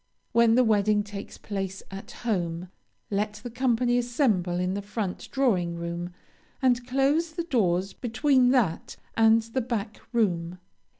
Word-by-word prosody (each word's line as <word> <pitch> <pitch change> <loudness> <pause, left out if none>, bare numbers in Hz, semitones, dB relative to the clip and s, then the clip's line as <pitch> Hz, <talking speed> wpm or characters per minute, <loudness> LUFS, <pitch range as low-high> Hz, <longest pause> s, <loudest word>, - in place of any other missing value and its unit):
When 235 -1 +5
the 255 - +5
wedding 210 -2 +3
takes 205 -1 -8
place 195 -2 -5
at 195 0 -8 0.2
home, 175 -5 -1 0.4
let 210 +1 0
the 245 - -6
company 245 0 +2
assemble 225 - +1
in 180 +1 0
the 200 - -3
front 200 -2 -4
drawing 190 -11 +1
room, 170 +1 -4 0.5
and 250 -2 +2
close 285 +5 +1
the 340 +1 -2
doors 195 - +1
between 255 +1 +2
that 235 -11 +1 0.2
and 225 0 +5
the 230 +4 -2
back 225 -3 -3
room. 180 -7 0
220 Hz, 140 wpm, -27 LUFS, 190-245 Hz, 0.5 s, When